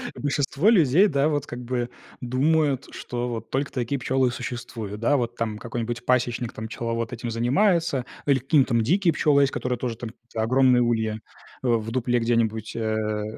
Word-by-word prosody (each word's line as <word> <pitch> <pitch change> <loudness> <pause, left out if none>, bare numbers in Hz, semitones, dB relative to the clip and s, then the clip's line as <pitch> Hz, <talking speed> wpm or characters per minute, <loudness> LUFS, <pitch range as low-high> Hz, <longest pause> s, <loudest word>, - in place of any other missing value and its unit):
большинство 145 +6 +1
людей, 180 - +5
да, 140 -3 +2
вот 145 -2 -1
как 120 - -6
бы 120 0 -2 0.3
думают, 140 +2 +1
что 120 0 -4
вот 115 -2 -5
только 140 +1 -1
такие 125 +2 -2
пчелы 130 +1 +1
и - - 0
существуют. 115 -4 -6
Да, 140 +6 +2
вот 120 -3 -2
там 110 -2 -2
какой-нибудь 120 +1 -4
пасечник 120 -2 0
там, 110 - -6
пчеловод 115 0 -3
этим 120 -1 -5
занимается 140 - +2 0.2
или 140 -2 +4
какие-нибудь 130 -3 +2
дикие 175 - +2
пчелы 145 -2 +3
есть, 140 - +1
которые 125 -2 -2
тоже 120 -3 -3
там 115 -2 -6 0.2
огромные 125 +2 +4
ульи, 110 -2 0 0.5
а, - - +2
в 115 -2 +1
дупле 125 0 +1
где-нибудь, 115 -2 0
э 110 -1 -1
125 Hz, 170 wpm, -24 LUFS, 115-140 Hz, 0.5 s, людей